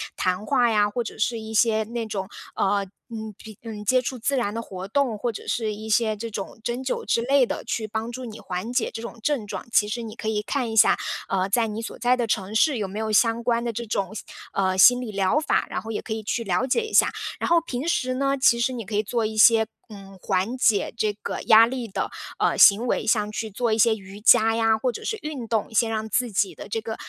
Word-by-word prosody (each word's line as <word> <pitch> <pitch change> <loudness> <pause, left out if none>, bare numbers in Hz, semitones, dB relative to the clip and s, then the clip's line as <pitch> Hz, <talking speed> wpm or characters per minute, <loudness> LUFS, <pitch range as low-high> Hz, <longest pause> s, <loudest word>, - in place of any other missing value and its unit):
谈 185 +3 -1
话 245 -2 +2
呀， 210 -1 +3
或 240 +3 -2
者 225 - -8
是 230 +1 0
一 220 0 -8
些 220 0 +3
那 230 +1 -4
种， 195 -3 -4 0.3
呃， 200 0 +1 0.3
嗯， 220 -1 -6
比 215 -3 -12
呃， 230 - -6 0.2
接 255 +2 +4
触 255 0 -4
自 275 +4 0
然 210 -5 -1
的 230 - -3
活 190 -4 -8
动， 250 -1 0
或 235 +3 -2
者 215 - -9
是 220 -3 -1
一 215 +1 -8
些 220 0 +2
这 230 +2 -6
种 205 0 -7
针 240 +2 -3
灸 260 - -2
之 230 - +2
类 275 +2 +4
的， 245 - -3
去 220 -2 -3
帮 220 +2 -4
助 255 +2 -7
你 225 -3 -8
缓 185 +5 -5
解 250 -2 0
这 225 - -6
种 235 0 -8
症 275 -7 -1
状。 - - -6
其 210 -2 +3
实 235 +3 -4
你 220 -1 -8
可 220 - -6
以 210 -1 -1
看 245 0 -2
一 220 - -4
下， - - +6 0.3
嗯， 190 0 0
在 230 +3 +2
你 220 0 -4
所 230 - -7
在 245 +2 +2
的 240 -2 -1
城 205 -2 -2
市 280 +4 +3
有 205 -3 -2
没 200 +3 -6
有 220 0 -2
相 230 +2 +3
关 235 0 +1
的 235 -1 -2
这 235 +1 -5
种， 200 -1 -2 0.4
嗯， 190 -1 0
心 245 +6 +7
理 240 -4 -5
疗 200 +7 +1
法， 310 - +1
然 - - -2
后 220 - -9
也 215 - -4
可 220 - -4
以 220 - -4
去 230 +2 -2
了 195 +5 0
解 270 - +2
一 440 - -9
下。 - - +5 0.3
然 - - -2
后 340 0 +5
平 280 -2 -5
时 255 -7 0
呢， 275 +1 0
其 250 -3 +4
实 235 +2 +1
你 235 -4 -6
可 210 +2 -5
以 210 - +3
做 225 +1 -1
一 215 0 -3
些， 220 0 +6 0.2
嗯， 195 -3 -12
缓 195 +5 -1
解 225 -5 +2
这 215 -2 0
个 - - -4
压 225 +1 +8
力 245 0 -4
的， 195 - -3 0.3
嗯， - - +1
行 205 +4 +7
为， - - -1
像 210 -2 +1
去 220 +1 -4
做 225 +2 -1
一 - - +1
些 225 +1 +5
瑜 195 0 -12
伽 225 +1 +5
呀， 225 -1 +2
或 250 +3 -1
者 230 - -8
是 440 - -2
运 290 -6 -5
动， 225 0 -1
先 225 +1 +2
让 220 0 -2
自 245 +2 0
己 200 0 0
的 - - -10
这 225 - -1
个 220 0 -5
225 Hz, 280 characters per minute, -24 LUFS, 210-240 Hz, 0.4 s, 压